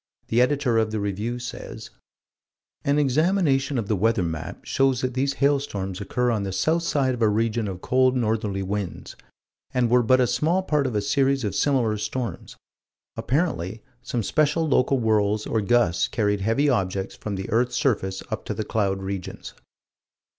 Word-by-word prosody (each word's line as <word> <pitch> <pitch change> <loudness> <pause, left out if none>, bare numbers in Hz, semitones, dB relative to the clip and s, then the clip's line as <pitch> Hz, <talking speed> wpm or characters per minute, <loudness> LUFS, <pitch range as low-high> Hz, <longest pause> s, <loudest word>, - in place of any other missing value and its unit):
The 115 +2 +3
Editor 125 -3 +2
of 110 -1 +1
the 110 0 -2
Review 105 +4 -2
says: 125 0 -8 0.9
"An 140 +1 +2
examination 145 -1 +2
of 110 -4 -2
the 110 - +1
weather 110 0 +2
map 80 -2 -5
shows 135 -2 +1
that 130 -1 -1
these 135 +2 0
hailstorms 135 -10 0
occur 125 +5 0
on 110 -3 0
the 100 -1 -3
south 160 - +1
side 140 -5 +1
of 120 - -5
a 110 - +4
region 110 +1 0
of 90 -2 -6
cold 130 0 +2
northerly 105 -4 -1
winds, 100 -1 -4 0.6
and 120 -2 +2
were 125 0 +5
but 130 +2 +4
a 125 - +4
small 155 +10 +1
part 150 -6 +1
of 120 - -4
a 105 - 0
series 135 +4 +1
of 105 - -2
similar 120 -7 +1
storms; 110 -2 -4 0.6
apparently 115 - -1 0.2
some 120 -2 -3
special 155 +6 +1
local 135 -1 +3
whirls 105 -2 +1
or 110 - 0
gusts 100 -5 +2
carried 105 -2 0
heavy 115 +8 +2
objects 95 -6 -1
from 105 -2 -5
this 95 0 -4
earth's 120 +3 +1
surface 100 -10 0
up - - -3
to - - -3
the 110 - -3
cloud 95 -3 -1
regions." 95 -1 -6
115 Hz, 175 wpm, -24 LUFS, 105-135 Hz, 0.9 s, were